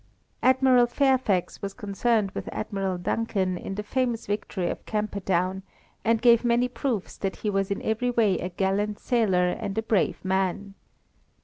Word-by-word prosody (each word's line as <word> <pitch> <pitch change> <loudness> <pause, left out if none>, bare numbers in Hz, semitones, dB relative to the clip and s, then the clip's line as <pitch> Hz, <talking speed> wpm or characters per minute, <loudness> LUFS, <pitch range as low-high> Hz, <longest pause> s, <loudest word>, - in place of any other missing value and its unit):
Admiral 255 -1 +5
Fairfax 255 -8 +1
was 195 0 -5
concerned 210 0 0
with - - -5
Admiral 195 -3 -2
Duncan 190 0 -1
in 195 +2 -6
the 210 - -4
famous 240 0 -1
victory 205 -3 -2
of - - -4
Camperdown, 190 -3 -1 0.4
and 230 0 +1
gave 235 -1 +6
many 240 +1 +2
proofs 250 -5 -3
that 195 -1 -2
he 210 - -2
was 195 -1 0
in 200 - -3
every 220 +3 0
way 220 -6 +2
a 180 - -3
gallant 195 +3 -1
sailor 190 -7 +2
and 195 +3 -4
a 220 - +1
brave 210 -4 0
man. 190 +1 -1
205 Hz, 155 wpm, -26 LUFS, 190-235 Hz, 0.4 s, gave